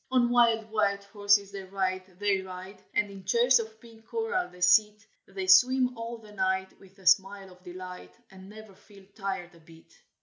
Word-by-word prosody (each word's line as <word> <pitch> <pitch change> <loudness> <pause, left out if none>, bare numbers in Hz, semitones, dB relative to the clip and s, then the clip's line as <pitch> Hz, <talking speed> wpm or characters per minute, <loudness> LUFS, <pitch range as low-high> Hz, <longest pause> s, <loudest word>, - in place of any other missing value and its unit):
"On 250 -2 +2
wild 230 -2 +3
white 200 -2 0
horses 200 0 +1
they 195 -1 -7
ride, 185 -1 -4
they 200 -1 0
ride, 190 +1 -10
And 205 -1 +1
in 195 -1 -11
chairs 235 +6 +4
of 220 -1 -7
pink 225 -1 -18
coral 450 -6 -2
they 180 - -17
sit, 210 +4 +4 0.2
They 190 -1 -5
swim 250 +7 +5
all 230 +1 -6
the 215 -2 -16
night, 190 -1 -1
with 195 0 -19
a 190 - -19
smile 195 +1 +2
of 180 0 -19
delight, 180 - -10 0.2
And 190 0 -13
never 215 -1 -13
feel 200 0 -19
tired 190 -4 -5
a 170 - -18
bit." 165 0 -19
200 Hz, 190 wpm, -28 LUFS, 190-220 Hz, 0.2 s, swim